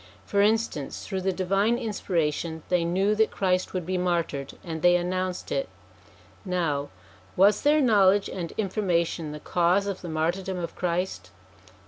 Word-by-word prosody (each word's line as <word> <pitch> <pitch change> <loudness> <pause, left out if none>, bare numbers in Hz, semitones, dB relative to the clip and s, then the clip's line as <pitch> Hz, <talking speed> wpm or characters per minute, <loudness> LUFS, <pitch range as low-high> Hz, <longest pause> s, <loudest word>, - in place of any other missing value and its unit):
For 200 - +1
instance, 215 -9 0
through 190 -2 -3
the 190 +1 +1
divine 195 +5 +1
inspiration 165 - -2
they 180 -2 +2
knew 190 +5 +1
that 220 +1 +3
Christ 185 -1 0
would 180 -3 -2
be 185 +1 -1
martyred, 170 -6 -2
and 160 -3 -5
they 175 +1 +5
announced 185 +1 -2
it. - - -1 0.7
Now, 165 -7 -1 0.5
was 200 +3 +5
their 300 +1 +4
knowledge 205 -5 +4
and 170 -3 -5
information 180 -6 0
the 150 - -7
cause 180 +5 +2
of 200 -2 -4
the 175 - -6
martyrdom 175 +4 -1
of 170 -1 -5
Christ 175 - -2
180 Hz, 150 wpm, -26 LUFS, 170-200 Hz, 0.7 s, they